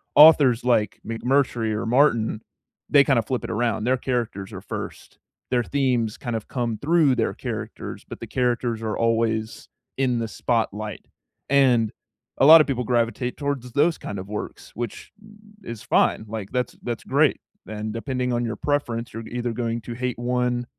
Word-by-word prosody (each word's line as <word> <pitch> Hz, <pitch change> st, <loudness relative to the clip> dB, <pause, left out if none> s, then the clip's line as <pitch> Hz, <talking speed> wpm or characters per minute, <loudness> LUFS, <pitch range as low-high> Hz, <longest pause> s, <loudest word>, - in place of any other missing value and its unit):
authors 145 Hz, -5 st, +7 dB
like 110 Hz, -5 st, +1 dB
McMurtry 120 Hz, -1 st, 0 dB
or 105 Hz, -, -2 dB
Martin, 115 Hz, -3 st, +2 dB, 0.5 s
they 140 Hz, -1 st, +7 dB
kinda 135 Hz, -5 st, +3 dB
flip 130 Hz, +2 st, -3 dB
it -, -, -5 dB
around. 115 Hz, -1 st, 0 dB
Their 130 Hz, +3 st, +2 dB
characters 120 Hz, -7 st, -3 dB
are -, -, -7 dB
first, -, -, -7 dB, 0.3 s
their 120 Hz, -1 st, +2 dB
themes 125 Hz, -6 st, 0 dB
kind 120 Hz, -3 st, -4 dB
of 110 Hz, -, -5 dB
come 120 Hz, -4 st, -2 dB
through 150 Hz, -1 st, +3 dB
their -, -, 0 dB
characters, -, -, -6 dB
but -, -, -8 dB
the -, -, -6 dB
characters 120 Hz, -2 st, 0 dB
are 110 Hz, -1 st, -2 dB
always 115 Hz, -1 st, 0 dB, 0.3 s
in 130 Hz, -3 st, +1 dB
the 115 Hz, -, -2 dB
spotlight, 110 Hz, +2 st, -2 dB, 0.4 s
and 125 Hz, -5 st, +4 dB, 0.5 s
a 135 Hz, -, +4 dB
lot 160 Hz, +1 st, +10 dB
of 155 Hz, -, 0 dB
people 125 Hz, -3 st, -1 dB
gravitate 120 Hz, +1 st, 0 dB
towards 140 Hz, -4 st, -3 dB
those 155 Hz, +3 st, +3 dB
kind 100 Hz, -, -6 dB
of 95 Hz, +2 st, -8 dB
works, 105 Hz, -, -6 dB
which 120 Hz, -1 st, -6 dB, 0.5 s
is 115 Hz, -, -7 dB
fine, -, -, +2 dB
like, 105 Hz, -3 st, -5 dB
that's 125 Hz, -1 st, -2 dB
that's 120 Hz, -2 st, -4 dB
great, 140 Hz, +2 st, +2 dB, 0.3 s
and 110 Hz, +1 st, -4 dB
depending 125 Hz, +1 st, -2 dB
on 120 Hz, 0 st, 0 dB
your 115 Hz, -, -3 dB
preference, 120 Hz, -5 st, -2 dB
you're 115 Hz, 0 st, -7 dB
either 120 Hz, -1 st, -3 dB
going 115 Hz, 0 st, -2 dB
to 120 Hz, -, -7 dB
hate 125 Hz, +1 st, -3 dB
one, 125 Hz, 0 st, 0 dB
120 Hz, 170 wpm, -24 LUFS, 115-130 Hz, 0.5 s, lot